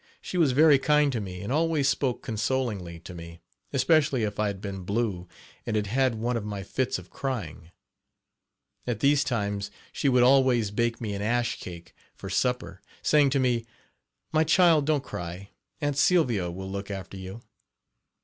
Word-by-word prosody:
She - - -7
was 160 -7 +3
very 150 0 +6
kind 150 0 +3
to 120 -4 -2
me 90 -2 -7
and 100 +7 -3
always 155 -2 +2
spoke 135 -2 0
consolingly 105 -6 -2
to 90 - -10
me, 85 -1 -10 0.3
especially 140 -2 +3
if 105 -1 -3
I 105 - +2
had 100 -1 -4
been 95 -1 -6
blue, 100 -2 -2 0.4
and 110 - -3
had 105 -1 +1
had 130 +3 +1
one 120 +3 -1
of 115 - -2
my 100 -2 -5
fits 130 +6 -1
of 90 0 -12
crying. 100 - -5 1.2
At 120 -3 -1
these 140 0 +4
times 100 -6 -2 0.2
she 140 - +1
would 125 -1 +4
always 125 -5 +4
bake 115 +2 0
me 110 -3 -3
an 100 - -4
ash 120 +2 0
cake 85 -2 -9 0.2
for - - -8
supper, 125 -6 -1 0.2
saying 150 -2 +4
to 135 +1 +1
me: 120 -3 +1 0.7
"My 155 0 +4
child, 160 -2 +4
don't 150 -3 +2
cry; 90 0 -7 0.3
'Aunt 145 -1 -1
Sylvia' 120 - +3
will 95 +2 -6
look 100 0 -5
after 100 -1 -6
you." 95 +4 -8
115 Hz, 175 wpm, -27 LUFS, 100-135 Hz, 1.2 s, very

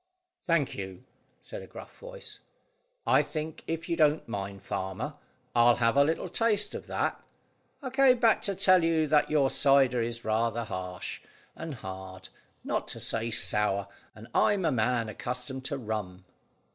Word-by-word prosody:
"Thank 165 -5 +1
you," 95 +1 -7 0.4
said - - -8
a - - -11
gruff - - -12
voice. - - -8 0.7
"I - - +5
think, 155 0 -5
if 165 0 -3
you 170 - 0
don't 155 -1 +3
mind, 100 -2 -5
farmer, 95 +12 -4 0.4
I'll 120 0 +6
have 115 0 +2
a 140 - +6
little 160 +3 -1
taste 210 -3 +1
of - - -7
that. - - -1 0.6
I 260 - -4
came 265 -1 +5
back 230 -2 +4
to 200 - -1
tell 185 -2 +5
you 165 -1 +2
that 150 0 +3
your 145 -3 +3
cider 135 -3 +4
is 115 0 -4
rather 115 +1 0
harsh 90 -4 -6 0.3
and 160 -3 -6
hard, 95 -3 -8 0.3
not - - -2
to - - -5
say 115 +1 0
sour, 105 -3 +2 0.3
and 110 +2 -12
I'm 200 -4 +3
a 160 - +3
man 120 -1 +1
accustomed 125 +4 -5
to 140 - -1
rum." 105 -6 -5
125 Hz, 160 wpm, -29 LUFS, 110-160 Hz, 0.7 s, I'll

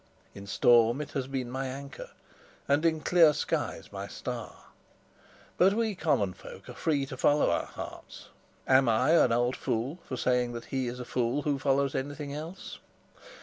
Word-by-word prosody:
In 100 0 -10
storm 120 +4 +4
it 150 - -5
has 135 -2 -3
been 130 -3 -4
my 135 +1 -3
anchor, 140 +1 -8 0.6
and 145 +3 +2
in 160 -1 0
clear 165 -3 +5
skies 150 - -3
my - - -6
star. - - -7 1.0
But 190 +2 +5
we 225 -1 0
common 145 - 0
folk - - -12
are - - -7
free 145 -4 0
to 135 -1 -7
follow 145 +3 +3
our - - -1
hearts; - - -9 0.4
am 130 -1 +5
I 125 +7 +3
an 160 -7 +5
old 120 +2 +1
fool 130 +6 -2
for 130 - -5
saying 125 -1 +1
that 115 0 -7
he 130 -2 0
is 120 +1 -5
a 125 - -6
fool 125 +4 -1
who 145 -1 0
follows 140 0 +1
anything 145 +1 -4
else? 160 +6 -7
135 Hz, 175 wpm, -29 LUFS, 125-150 Hz, 1.0 s, clear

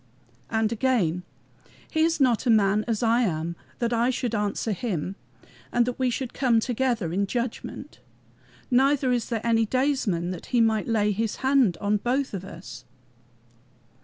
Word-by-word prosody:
And 220 -1 +1
again: 220 -8 +1 0.7
"He 315 - -1
is 325 0 +2
not 255 -2 +2
a - - +3
man 210 -1 +4
as 230 -1 -1
I 230 +1 +3
am 170 -5 -1 0.2
that 235 -1 -1
I 235 +2 +2
should 245 -2 -2
answer 210 +1 -1
him, 190 -3 -3 0.6
and 240 -1 +3
that 250 +1 -4
we 260 -1 +2
should 250 0 -3
come 245 -4 +3
together 235 -7 -1
in 200 +2 0
judgment. 240 +2 -5 0.7
Neither 265 +1 +3
is 240 -2 -1
there 230 -1 -2
any 225 -1 +3
daysman 255 -10 0
that 180 - -8
might 225 -2 +3
lay 210 -2 +2
his 215 +1 -1
hand 260 -10 +3
on 205 +1 +1
both 255 +5 -1
of 190 -2 -4
us." 170 -10 -10
230 Hz, 160 wpm, -25 LUFS, 200-250 Hz, 0.7 s, man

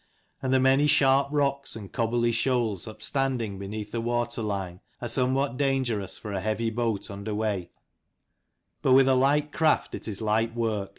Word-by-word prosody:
And 130 - -1
the 130 - +4
many 135 +3 +4
sharp 135 -1 +4
rocks 140 -3 0
and 105 -4 -9
cobbly 120 +1 +1
shoals 115 -4 0
upstanding 115 -3 -2
beneath 105 +1 -6
the 115 - -2
water 120 0 -1
line 95 -4 -3 0.2
are 120 - -4
some 130 +2 +1
what 135 -2 -1
dangerous 130 -8 -1
for 105 - -7
a 95 - -1
heavy 110 +2 -1
boat 115 -3 -2
under 100 +2 -5
way: 105 -5 -2 1.1
but 130 - +4
with 135 0 +6
a 135 - +5
light 145 +3 +2
craft 160 0 +1
it - - -5
is 105 -3 -4
light 110 +1 0
work. 110 -4 -1
115 Hz, 175 wpm, -27 LUFS, 105-135 Hz, 1.1 s, with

